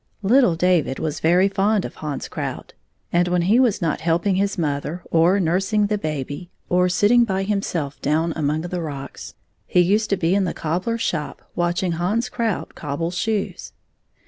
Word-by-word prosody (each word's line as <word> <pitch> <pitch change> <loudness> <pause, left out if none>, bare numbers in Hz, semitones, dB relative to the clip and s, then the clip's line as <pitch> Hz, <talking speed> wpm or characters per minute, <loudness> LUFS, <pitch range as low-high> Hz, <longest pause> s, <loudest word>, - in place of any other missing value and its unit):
Little 230 -3 +4
David 170 -6 +2
was 155 -1 -3
very 175 +4 +4
fond 200 +1 +1
of - - -6
Hans 150 -2 -4
Krout, - - -5 0.4
and 175 +1 +3
when 175 -1 +1
he 210 +7 +4
was 235 -8 +2
not 160 -3 -1
helping 170 +4 +1
his 200 +2 0
mother, 150 +2 -2
or 170 +4 +4
nursing 195 +5 +1
the 210 +1 0
baby, 155 +1 -4 0.2
or 180 0 +3
sitting 215 +6 +4
by 195 -4 -1
himself 180 -8 -2
down 160 +3 +1
among 155 0 0
the 175 +1 -4
rocks, 140 -4 -7 0.3
he - - +2
used 205 +5 +3
to 200 - +1
be 170 0 +1
in 200 0 +3
the 175 - -3
cobbler's 185 +9 -2
shop 155 -8 -3
watch 175 +1 0
ing 180 - 0
Hans 190 +9 -1
Krout 230 -5 -2
cobble 155 +3 -3
shoes. 205 +3 -2
180 Hz, 175 wpm, -22 LUFS, 160-200 Hz, 0.4 s, Little